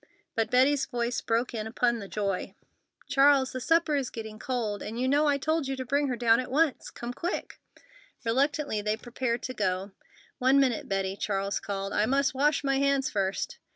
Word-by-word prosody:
But 225 -1 0
Betty's 270 +3 +3
voice 240 -2 -2
broke 230 +2 0
in 220 -1 -3
upon 235 +1 +1
the 200 - -7
joy: 195 -2 -3 0.5
"Charles, 275 -1 +4
the 255 - -5
supper 325 +1 +2
is 275 -4 -1
getting 220 -1 -8
cold, 225 -6 -2
and 225 +2 -5
you 255 - +1
know 290 +3 +3
I 285 -1 +3
told 310 +1 0
you 270 - -2
to 260 -1 -5
bring 285 +3 +1
her 255 - -1
down 235 -1 +4
at 255 - -4
once. 295 +1 +1
Come 240 +1 -6
quick!" 345 +8 -4 0.7
Reluctantly 275 -1 +1
they 210 +1 -1
prepared 240 0 -3
to 255 - -4
go. 190 -2 -1 0.5
"One 260 +2 +4
minute, 255 -5 +1
Betty!" 195 -1 -1
Charles 200 -1 -1
called. 195 -1 -4
"I 210 +1 +2
must 275 +1 +2
wash 290 +2 +2
my 275 -1 +1
hands 275 -1 +1
first!" 195 -2 -2
250 Hz, 190 wpm, -28 LUFS, 215-275 Hz, 0.7 s, Charles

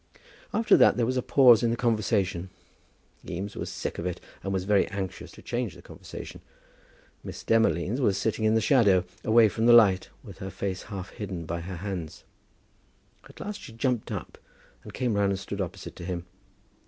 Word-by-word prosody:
After 225 - +4
that - - +5
there 120 - +2
was 130 +2 -1
a 125 - +1
pause 125 -3 +6
in 120 - +2
the 115 - +1
conversation. 100 -6 0 0.7
Eames 100 +4 -5
was - - -4
sick - - -5
of 85 - -4
it, 90 - -4 0.2
and 95 - -3
was 95 -1 -1
very 100 0 +3
anxious 95 -2 -5
to - - -14
change 120 -6 -3
the - - -14
conversation. - - -10 0.8
Miss - - -8
Demolines 115 0 +2
was 100 -6 +2
sitting 110 +1 -1
in 110 0 +3
the 110 - +3
shadow, 105 - +4 0.2
away 110 0 +6
from 110 +2 0
the 120 - +8
light, 100 -6 +6
with - - -12
her 95 - -5
face 95 0 -4
half 95 -3 -6
hidden 95 -5 -6
by 85 +1 -4
her 90 +2 -6
hands. 90 -3 -6 1.1
At - - -15
last 210 +1 -6
she 115 - -10
jumped 120 0 -1
up, - - -6 0.4
and - - -10
came 125 -3 -1
round 100 -1 +2
and 95 - -3
stood 100 0 -5
opposite 95 +1 -6
to 90 - -8
him. 90 -1 -4
100 Hz, 190 wpm, -27 LUFS, 95-115 Hz, 1.1 s, the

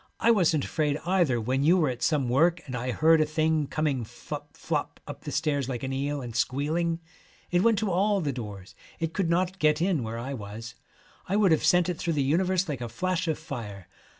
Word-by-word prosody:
I 235 - +4
wasn't 170 - +3
afraid 150 -2 0
either 175 -9 +2
when 130 +4 0
you 170 +5 +5
were 160 -4 +3
at 125 -1 -5
some 150 -5 +1
work 165 +8 +3
and 130 - -6
I 125 +1 -3
heard 160 +4 +4
a - - +6
thing 155 -1 +1
coming 145 -5 -1
flop 110 - -9
flop - - -3
up - - -9
the - - -4
stairs 145 -4 0
like 125 -2 -4
an 135 0 -2
eel, 140 +1 -2
and 120 -2 -7
squealing. 155 +8 0 0.5
It 175 0 +3
went 230 +1 +4
to 205 -1 0
all 200 +3 +2
the 145 -6 -1
doors. 105 -6 -8 0.3
It 165 -1 -2
could 190 -4 0
not 185 +2 0
get 150 -1 +3
in 175 -4 +1
where 115 0 -4
I 130 +4 -4
was. 110 0 -7 0.6
I 195 - +1
would 205 -4 +4
have 160 - +3
sent 180 -1 +4
it 180 -3 -3
through 170 - -1
the 145 -3 +1
universe 180 +6 +1
like 140 -5 -4
a 120 - -4
flash 180 +8 -1
of 160 - 0
fire. 105 - -7
155 Hz, 225 wpm, -27 LUFS, 130-175 Hz, 0.6 s, a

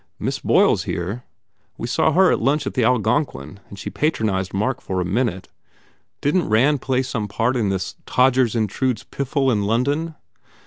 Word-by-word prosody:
Miss - - -3
Boyle - - +4
s - - -2
here. 100 +8 -4 0.5
We - - -4
saw 120 - +2
her 185 +1 +5
at - - 0
lunch 140 +4 +1
in - - -3
the 125 - +1
Algonquin 110 - 0
and 100 - -10
she - - -6
patronized 105 - -1
Mark 100 +2 -1
for 95 -1 -3
a 90 - -1
minute. 100 -1 -1 0.7
Didn 150 +6 +2
t - - -5
Rand 130 +7 +3
play 130 -1 0
some 115 -5 -3
part 115 +5 0
in 110 -5 0
this 95 -1 -2
Todgers 125 -2 +3
Intrudes 115 +3 -1
piffle 135 0 -1
in 105 -4 +1
London?" 140 +9 0
120 Hz, 180 wpm, -21 LUFS, 100-135 Hz, 0.7 s, her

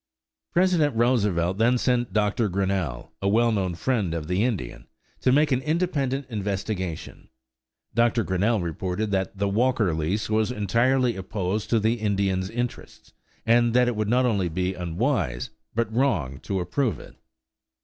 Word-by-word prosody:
President 170 -6 +2
Roosevelt 105 -7 +1
then 120 +2 +4
sent 120 -1 0
Dr. 105 +1 +1
Grinnell, 95 -8 -2
a 100 - +1
well 115 +3 +3
known 95 -5 -1
friend 100 -6 -1
of 80 -2 -4
the 90 +4 +1
Indian, 115 -8 -3 0.3
to 130 - +2
make 150 +3 +3
an 130 0 +2
independent 145 -4 -1
investigation. 100 -5 -4 0.6
Dr. 115 0 +2
Grinnell 100 +3 +1
reported 90 +5 -3
that 95 0 -1
the 100 +1 0
Walker 110 -2 +1
lease 80 +7 -1
was 110 +1 +1
entirely 120 +3 +1
opposed 95 +1 -3
to 115 - +3
the 110 +2 +1
Indians' 95 -3 0
interests, 120 +2 -6 0.3
and 120 0 +3
that 125 0 +5
it 120 - 0
would 105 -1 -1
not 125 +2 +3
only 100 -7 +1
be 90 +3 -1
unwise, 90 - -1 0.2
but 115 -1 -1
wrong, 90 - 0
to 95 +7 -3
approve 110 +6 -1
it. - - -13
105 Hz, 150 wpm, -25 LUFS, 95-120 Hz, 0.6 s, that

